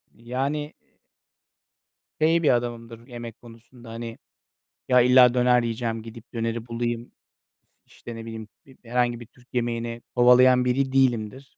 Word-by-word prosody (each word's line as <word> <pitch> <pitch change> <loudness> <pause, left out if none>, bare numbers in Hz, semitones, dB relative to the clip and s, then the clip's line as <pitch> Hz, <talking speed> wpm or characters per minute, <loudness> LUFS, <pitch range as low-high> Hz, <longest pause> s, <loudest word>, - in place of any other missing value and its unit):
Yani 135 +6 -3 1.5
şey 165 +2 +3
bir 150 - +4
adamımdır 115 -1 -5
yemek 120 -2 -9
konusunda, 115 +1 -15
hani, 115 0 -7 0.7
ya, 125 -1 +5
illa 125 0 +6
döner 125 0 +3
yiyeceğim, 115 -1 -3
gidip 115 +2 -13
döneri 115 0 -3
bulayım, 120 0 -3 0.7
işte, 120 - -11
ne 115 0 -8
bileyim, 110 -1 -8 0.2
bi 135 -1 -19
herhangi 120 0 0
bir 120 - -10
Türk 125 +1 -24
yemeğini 120 -1 -2
kovalayan 125 +1 +6
biri 130 +2 0
değilimdir. 130 -1 0
120 Hz, 130 wpm, -24 LUFS, 115-125 Hz, 1.5 s, illa